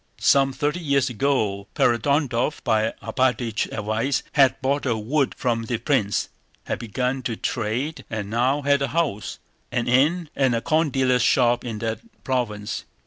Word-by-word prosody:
Some 135 -1 +4
thirty 150 +5 -1
years 140 -5 +1
ago 105 -6 0
Ferapóntov, 135 +2 +1
by 110 -3 +2
Alpátych's 125 -4 0
advice, 110 +5 -1
had 135 -2 +4
bought 140 +1 0
a 115 -3 +1
wood 135 +6 0
from 115 -2 -1
the 120 +1 -1
prince, 110 -5 0 0.3
had - - -3
begun 125 +4 -2
to 120 -2 -3
trade, 120 +8 -2
and 110 -3 -4
now 125 +6 +1
had 140 0 +3
a 140 - +1
house, 150 -11 -2 0.3
an 120 -1 -1
inn, 150 +8 +3
and 130 -3 +2
a 115 - -1
corn 155 +2 +2
dealer's 130 -2 +2
shop 120 0 +3
in 115 -3 -4
that 110 0 -2 0.2
province. 105 -6 -2
125 Hz, 155 wpm, -23 LUFS, 115-140 Hz, 0.3 s, Some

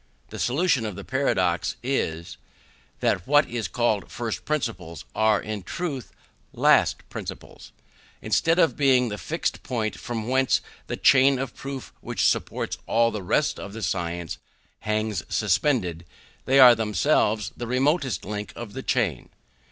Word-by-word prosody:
The - - -8
solution 140 -1 +2
of 105 - -6
the - - -7
paradox 105 -10 0
is, 85 -11 -2 0.6
that 90 - 0
what 145 +1 +5
are 120 -2 -2
called 115 -4 0
first 115 -2 -4
principles, 115 - -3
are, 110 -1 +3
in 105 -2 -5
truth, 140 - -5 0.4
last - - +3
principles. - - -8 0.5
Instead 135 - +1
of 165 -3 +3
being 130 -4 +3
the 105 -1 -5
fixed - - -3
point 110 -4 -2
from 115 -2 -4
whence 130 +1 +2 0.3
the - - -4
chain 135 +1 +5
of 130 -1 -4
proof 135 -2 -7
which - - -1
supports - - 0
all 115 0 +3
the 105 - -4
rest 145 +11 0
of 100 0 -8
the 110 0 -6
science 85 -3 -3 0.4
hangs 105 0 -1
suspended, 105 - +1 0.4
they 135 +1 +4
are 125 -2 +10
themselves 110 -2 +1
the 120 - -5
remotest 130 - 0
link 105 +1 -5
of 115 -4 -8
the - - -5
chain. - - -1
115 Hz, 145 wpm, -25 LUFS, 105-135 Hz, 0.6 s, are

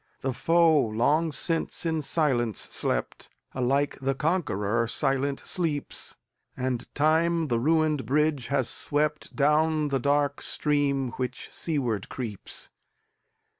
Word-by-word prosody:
The 135 -1 -1
foe 165 +2 +4
long 145 +9 +1
since 165 +4 -2
in 160 -1 0
silence 130 - 0
slept; - - -3 0.2
Alike 135 +3 0
the 135 0 0
conqueror 120 - 0
silent 135 +3 0
sleeps; 160 -6 -2 0.4
And 125 -1 -2
Time 160 +1 +2
the 120 -1 +1
ruined 155 +1 +2
bridge 145 -2 +1
has 140 -4 +1
sweptDown 150 +1 +1
the 135 - +1
dark 145 +2 +1
stream 140 -3 0
which 125 -1 -4
seaward 125 - -1
creeps. 115 -6 -6
145 Hz, 110 wpm, -27 LUFS, 130-155 Hz, 0.4 s, foe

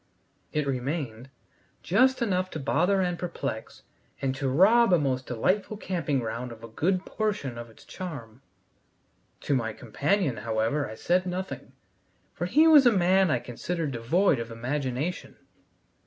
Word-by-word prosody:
It 150 -1 0
remained, 130 -2 -3 0.5
just 260 -1 +3
enough 185 -4 0
to 160 - -6
bother 180 +7 +2
and 180 -2 -1
perplex, 135 -10 -5 0.4
and 135 -1 -1
to 135 0 -2
rob 205 - +5
a - - +7
most 130 -4 -1
delightful 190 - 0
camping 170 -8 -2
ground 120 +2 -4
of 115 -1 -12
a - - -7
good 180 +11 -1
portion 205 - -2
of 120 0 -8
its 110 - -18
charm. 135 - -8 1.0
To - - -1
my 115 -4 0
companion, 140 - -1
however, 110 +5 -1
I 110 - -7
said 180 +9 +1
nothing, 185 +1 -5 0.6
for - - -3
he 315 +2 +5
was 295 -5 +8
a - - +7
man 190 -1 +3
I 130 - +2
considered 150 +7 -4
devoid 135 +6 +2
of 115 0 -5
imagination. 130 +7 -3
145 Hz, 150 wpm, -27 LUFS, 120-185 Hz, 1.0 s, was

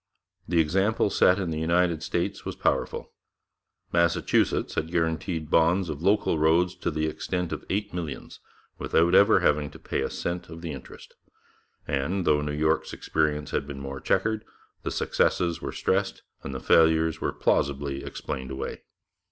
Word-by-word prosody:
The 85 -1 +2
example 95 +7 +2
set 90 - +4
in 95 -4 -2
the 80 - -2
United 85 0 +2
States - - -2
was - - -5
powerful. - - -1 0.8
Massachusetts 85 0 +2
had 80 - -2
guaranteed 80 -1 -1
bonds 85 +2 +3
of 75 -1 -5
local 95 -3 +2
roads 85 +3 +3
to - - -2
the 80 -1 -1
extent 90 +2 -3
of - - -5
eight 100 +2 -2
millions, 80 -6 -6 0.4
without 85 +2 +2
ever 100 +2 +6
having 75 -1 +2
to - - -12
pay - - -3
a - - -1
cent 85 -1 -4
of 80 0 -9
the 85 -2 -4
interest; 70 -3 -11 0.7
and 75 +7 -1
though 75 -2 +3
New 75 0 -2
York's 80 +2 0
experience 75 -1 -1
had 70 - -1
been 70 -2 -7
more 70 0 -6
chequered, 110 +3 0 0.4
the - - -3
successes 85 -2 0
were - - -4
stressed 95 +1 -1 0.2
and 70 - -6
the - - -3
failures 80 +2 +3
were - - 0
plausibly 70 0 0
explained 65 -1 -5
away. 65 0 -5
80 Hz, 160 wpm, -26 LUFS, 75-90 Hz, 0.8 s, ever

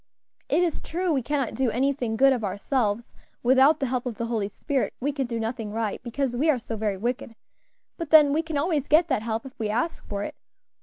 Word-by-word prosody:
It 355 - +3
is 340 -3 -1
true 350 0 -1
we 270 - +1
cannot 275 -1 -1
do 260 -2 +1
anything 245 -1 0
good 270 +2 +6
of 245 -4 -3
ourselves; 210 +3 -1 0.3
without 265 +5 +5
the 275 - 0
help 255 0 -2
of 230 -4 -5
the 230 - -2
Holy 225 -4 -1
Spirit 265 +6 -2
we 285 +4 0
can 275 -3 -2
do 230 -1 -3
nothing 225 -1 -3
right, 220 -1 -2
because 245 +1 -2
we 295 +6 +2
are 295 - +4
so 230 -1 -6
very 210 -2 -1
wicked; 235 +2 -3 0.6
but 335 -3 -4
then 295 -2 +7
we 315 - +2
can 320 -2 -4
always 295 -2 0
get 320 +3 +4
that 260 -6 +1
help 225 +1 -3
if 260 - -12
we 215 -2 -1
ask 245 +10 -1
for 200 -1 -3
it. - - -5
255 Hz, 225 wpm, -26 LUFS, 225-285 Hz, 0.6 s, then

